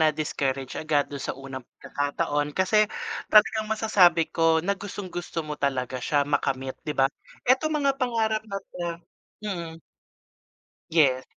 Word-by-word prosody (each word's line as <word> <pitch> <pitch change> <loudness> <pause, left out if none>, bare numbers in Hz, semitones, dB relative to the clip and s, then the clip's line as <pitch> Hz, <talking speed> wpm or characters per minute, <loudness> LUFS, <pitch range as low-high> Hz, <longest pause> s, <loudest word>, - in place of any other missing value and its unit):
na 160 - +6
discourage 140 -3 -2
agad 150 -2 0
dun 140 - -5
sa - - -4
unang 135 -1 -7 0.2
pag-kakataon 145 +1 -2
kasi, 210 +3 +4 0.4
talagang 215 0 +5
masasabi 190 -7 +4
ko 165 -1 +3
na 200 - +2
gustong-gusto 185 -4 -5
mo 150 -1 -6
talaga 130 -2 -1
siya 145 +3 +1
makamit 135 -2 -1 0.2
'di 150 - -2
ba? 135 - +5 0.4
Etong 285 +5 +3
mga 275 0 +1
pangarap 225 -3 +1
na 200 - -3 0.2
to - - -8 0.6
mm. 170 -5 -4 1.1
Yes. 135 -6 +3
160 Hz, 135 wpm, -26 LUFS, 145-210 Hz, 1.1 s, na